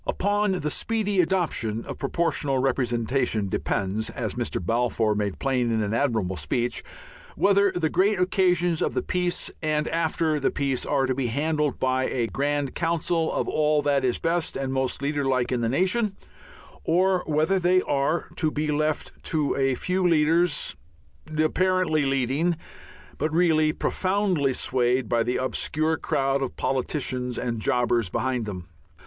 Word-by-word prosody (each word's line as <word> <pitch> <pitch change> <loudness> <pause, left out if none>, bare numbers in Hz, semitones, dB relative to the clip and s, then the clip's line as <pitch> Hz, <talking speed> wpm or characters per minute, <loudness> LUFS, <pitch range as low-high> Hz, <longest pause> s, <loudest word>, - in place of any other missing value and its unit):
Upon 205 0 +1
the 150 -5 -2
speedy 205 -2 +1
adoption 160 - -1
of - - -7
Proportional 150 -5 0
Representation 120 -4 0
depends, 100 +4 -1
as - - -4
Mr. - - -2
Balfour 115 +2 +1
made 105 -2 -2
plain 125 -3 0
in 110 -1 +1
an 105 +1 -2
admirable 110 -8 0
speech, 120 - -1 0.5
whether 200 0 +3
the 175 -3 0
great 195 +2 +2
occasions 180 -3 +2
of - - 0
the - - 0
peace 180 -1 -1
and 155 -1 0
after 160 -1 0
the 135 - +1
peace 135 -3 -1
are 140 -2 +2
to 130 - 0
be 130 -1 -1
handled 150 +3 -1
by 130 0 +1
a 120 -3 -1
grand 140 +3 -1
council 165 -1 0
of - - -1
all 150 -1 +2
that 140 -2 +2
is 125 -2 +1
best 165 -2 -1
and 135 -1 -2
most 130 0 -1
leaderlike 135 -4 0
in 125 -2 0
the 115 - 0
nation, 190 - +1 0.7
or 185 +2 +2
whether 155 +5 +2
they 185 +1 +3
are 145 +4 0
to 160 - +2
be 150 0 -2
left 155 +1 -1
to 155 -3 0
a 135 -1 +1
few 185 +7 -1
leaders, 165 0 +2 0.6
apparently 160 -1 +2
leading, 135 +6 +1 0.6
but 155 - 0
really 160 -2 +3
profoundly 185 -5 0
swayed 125 -1 +1
by 115 +1 +1
the 120 +2 0
obscure 155 +4 0
crowd 135 -2 0
of 135 - -3
politicians 130 -1 -2
and 115 -2 -2
jobbers 120 -3 +1
behind 125 +1 -1
them. 90 -4 -6
145 Hz, 155 wpm, -25 LUFS, 125-170 Hz, 0.7 s, whether